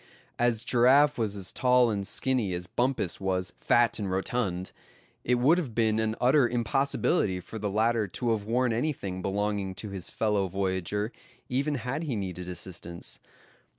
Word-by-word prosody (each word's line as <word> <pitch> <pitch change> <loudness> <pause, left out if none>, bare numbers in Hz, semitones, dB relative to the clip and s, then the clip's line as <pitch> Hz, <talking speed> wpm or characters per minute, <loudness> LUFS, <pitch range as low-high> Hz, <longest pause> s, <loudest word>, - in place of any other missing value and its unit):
As 120 -2 +2
Giraffe 135 +4 +4
was 105 -3 0
as 95 -2 -3
tall 125 -2 +4
and 100 -2 -2
skinny 120 -9 0
as 90 0 -4
Bumpus 120 -1 -1
was 95 -1 -1
fat 120 -1 +2
and 100 -2 -2
rotund, 95 -1 -1 0.5
it 125 - +2
would 140 +9 +4
have 130 -11 -5
been 110 -2 +2
an 110 0 0
utter 130 0 +4
impossibility 120 - +1
for 110 +5 -8
the 105 -1 -2
latter 110 +1 +1
to 120 +5 -2
have 110 -2 0
worn 120 +2 +1
anything 110 -8 -2
belonging 100 0 -1
to 100 +2 -6
his 95 -3 -5
fellow 105 -3 0
voyager, 95 +3 -2 0.4
even 140 +4 0
had 125 +4 -3
he 145 -7 -2
needed 90 -3 -4
assistance. 85 -1 -7
110 Hz, 160 wpm, -28 LUFS, 95-125 Hz, 0.5 s, Giraffe